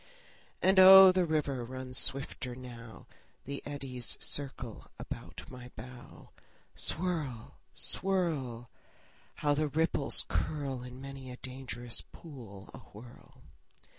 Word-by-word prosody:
And 190 Hz, +1 st, +5 dB
oh, 190 Hz, 0 st, +11 dB
the 185 Hz, -1 st, +1 dB
river 145 Hz, -5 st, -1 dB
runs 130 Hz, +1 st, -7 dB
swifter 135 Hz, -2 st, -2 dB
now; 120 Hz, -3 st, -11 dB, 0.4 s
The 140 Hz, +1 st, -5 dB
eddies 135 Hz, -4 st, -2 dB
circle 130 Hz, -5 st, -1 dB
about -, -, -8 dB
my 125 Hz, -1 st, -10 dB
bow. 125 Hz, +2 st, -12 dB, 0.4 s
Swirl, 155 Hz, -10 st, -1 dB, 0.2 s
swirl! 150 Hz, -12 st, -1 dB, 0.6 s
How 145 Hz, -1 st, +1 dB
the 155 Hz, +1 st, 0 dB
ripples 150 Hz, -1 st, +2 dB
curl 140 Hz, -4 st, -2 dB
In 125 Hz, +1 st, -10 dB
many 135 Hz, -1 st, -9 dB
a 125 Hz, -, -8 dB
dangerous 125 Hz, -2 st, -4 dB
pool 115 Hz, -, -12 dB
awhirl! 120 Hz, +4 st, -15 dB
130 Hz, 105 wpm, -31 LUFS, 125-150 Hz, 0.6 s, oh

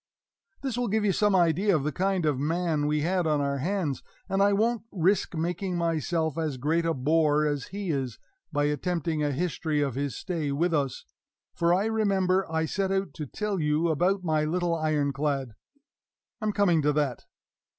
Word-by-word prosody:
This 255 Hz, -3 st, -2 dB
will 245 Hz, -, 0 dB
give 215 Hz, +1 st, +1 dB
you 200 Hz, -, +3 dB
some 205 Hz, +1 st, +2 dB
idea 180 Hz, +3 st, +3 dB
of 150 Hz, -, 0 dB
the 150 Hz, -, -1 dB
kind 190 Hz, 0 st, 0 dB
of 145 Hz, -4 st, +1 dB
man 160 Hz, 0 st, 0 dB
we 150 Hz, 0 st, +1 dB
had 175 Hz, +1 st, +1 dB
on 150 Hz, -1 st, +2 dB
our 140 Hz, -1 st, -1 dB
hands; 170 Hz, -2 st, -1 dB, 0.3 s
and 195 Hz, 0 st, 0 dB
I 200 Hz, +1 st, +5 dB
won't 225 Hz, +3 st, +1 dB
risk 190 Hz, 0 st, +1 dB
making 180 Hz, +3 st, -2 dB
myself 165 Hz, -1 st, 0 dB
as 155 Hz, -5 st, -2 dB
great 160 Hz, +6 st, 0 dB
a 165 Hz, -, +1 dB
bore 150 Hz, +2 st, +2 dB
as 145 Hz, -3 st, -1 dB
he 195 Hz, -3 st, -4 dB
is, 130 Hz, -5 st, -2 dB, 0.3 s
by 145 Hz, -2 st, +1 dB
attempting 160 Hz, +1 st, -1 dB
a 145 Hz, -, +1 dB
history 160 Hz, 0 st, -1 dB
of 140 Hz, -3 st, 0 dB
his 140 Hz, -1 st, -3 dB
stay 160 Hz, -6 st, -3 dB
with 165 Hz, +5 st, +1 dB
us; 140 Hz, -4 st, -1 dB, 0.5 s
for 170 Hz, 0 st, +1 dB
I 190 Hz, +4 st, +3 dB
remember 195 Hz, -5 st, +1 dB
I 160 Hz, 0 st, +1 dB
set 190 Hz, +4 st, -1 dB
out 195 Hz, 0 st, -1 dB
to 150 Hz, -4 st, -6 dB
tell 210 Hz, +5 st, -2 dB
you 155 Hz, +2 st, +1 dB
about 180 Hz, +5 st, +1 dB
my 155 Hz, -3 st, +1 dB
little 170 Hz, +2 st, 0 dB
Iron 155 Hz, -3 st, 0 dB
clad. 140 Hz, -4 st, -1 dB, 0.9 s
I'm 215 Hz, -1 st, 0 dB
coming 195 Hz, -6 st, +3 dB
to 150 Hz, 0 st, +2 dB
that. 145 Hz, -5 st, -1 dB
165 Hz, 190 wpm, -27 LUFS, 150-190 Hz, 0.9 s, I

